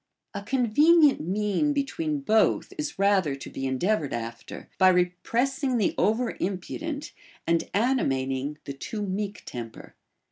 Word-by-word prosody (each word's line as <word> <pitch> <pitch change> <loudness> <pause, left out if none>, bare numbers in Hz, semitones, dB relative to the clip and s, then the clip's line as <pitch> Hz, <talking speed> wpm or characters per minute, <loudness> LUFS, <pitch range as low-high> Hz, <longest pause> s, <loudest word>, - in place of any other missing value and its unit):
A 200 - -4
convenient 270 +7 +4
mien 210 - 0
betAveen 285 +1 -2
both 220 0 +2
is 300 -1 -4
rather 195 -7 +2
to 135 - -9
be 135 - -4
endeav 155 +12 +1
ored 145 - -5
after, 115 0 -6
by 185 -1 +7
repressing 240 - +1
the 210 - +1
over 225 +3 +1
impudent, 285 - -4 0.3
and 165 0 +1
ani 250 +5 +2
mating 135 +2 -2
the 140 - -5
too 210 +9 -5
meek 200 +1 -4
temper. 115 -2 -8
205 Hz, 140 wpm, -26 LUFS, 165-270 Hz, 0.3 s, by